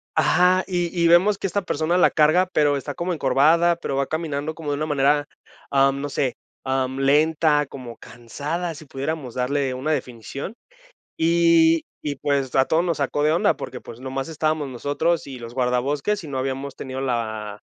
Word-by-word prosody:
Ajá. 180 +5 +4
Y 175 -2 0 0.2
y - - +5
vemos 185 +4 +5
que 195 - -2
esta 200 +2 -1
persona 170 0 0
la 180 - +5
carga, 160 +4 +4
pero 145 -3 +2
está 135 - -5
como 175 +1 -2
encorvada, 160 +4 +3
pero 140 - -4
va 135 0 0
caminando 155 -1 -3
como 155 -3 -4
de - - 0
una 155 - -1
manera, 145 0 +2 0.4
am, 135 0 +3
no 145 - -3
sé, 135 -2 -1 0.3
am, 130 0 -1
lenta, 150 +1 +3
como 125 -4 -9
cansada, 150 +9 -5
si 155 - -11
pudiéramos 135 -2 -5
darle 130 +1 0
una 135 +5 -2
definición. 135 - -5 0.6
Y 165 0 +4 0.2
y 145 -1 -3
pues, 140 -1 -1
a 130 - +5
todos 160 +5 +1
nos 170 -4 -1
sacó 145 +1 0
de 155 - +3
onda 170 - +2
porque, - - -7
pues, 115 - -11
nomás 135 +3 -4
estábamos 155 -2 -1
nosotros 145 +7 -1
y 135 -2 -7
los 115 0 -9
guardabosques, 135 +10 0
y 150 - -8
no 135 - -4
habíamos 135 +1 -3
tenido 130 0 -6
la 110 -5 -3
145 Hz, 185 wpm, -23 LUFS, 135-165 Hz, 0.6 s, y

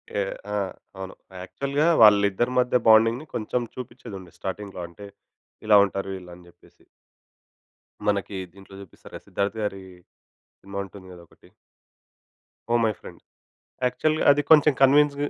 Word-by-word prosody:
Yeah! 100 -1 -2 0.2
ఆ! - - 0 0.4
అవును. 95 0 -8 0.3
యాక్చువల్‌గా 140 - -1 0.2
వాళ్లిద్దరి 105 +3 +4
మధ్య 125 0 +2
బాండింగ్‌ని 115 +5 +5
కొంచెం 120 +3 -2
చూపించేది 120 -3 -9
ఉండే 90 -3 -14
స్టార్టింగ్‌లో 95 -1 -6
అంటే 95 +4 -13 0.6
ఇలా 105 -1 +7
ఉంటారు 100 0 -5
వీళ్లు 90 -1 -11
అని 90 0 -17
చెప్పేసి. - - -24 1.2
మనకి 100 -1 -1 0.2
దీంట్లో 100 0 -15
చూపిస్తారు 95 - -15
కదా! - - -11
సిద్ధార్థ్ 100 +2 -2
గారి 95 -2 -4 0.8
సినిమా 100 0 -8
ఉంటుంది 95 0 -14
కదా! 85 - -14
ఒకటి. - - -23 1.3
Oh 120 - +3
my 110 - +2
friend. - - -13 0.6
యాక్చువల్‌గా 155 +5 0
అది 145 +1 +2
కొంచెం 150 -2 +7
కన్విన్స్ 145 +1 +5
105 Hz, 135 wpm, -24 LUFS, 95-125 Hz, 1.3 s, ఇలా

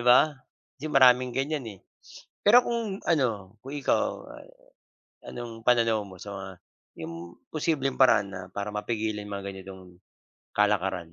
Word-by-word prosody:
ba? 120 +1 +7 0.6
Kasi 155 - -4
maraming 125 -3 +5
gan'yan, 140 0 -1
eh. 100 -3 -10 0.6
Pero 240 +4 +6
kung 230 -5 -3
ano, 110 - 0
kung 135 +4 -9
ikaw 145 - -1 0.9
anong 115 -2 -8
pananaw 115 -3 +3
mo 95 -2 -12
sa 100 - -8
mga 95 0 -6 0.5
'yong 85 0 -6 0.3
posibleng 145 -4 -1
paraan 130 -6 +5
na 95 -1 -7
para 100 +2 -4
mapigilin 105 -1 -2
mga 100 0 -4
ganitong 95 -1 -12 0.5
kalakaran? 95 -5 +1
110 Hz, 130 wpm, -27 LUFS, 100-135 Hz, 0.9 s, ba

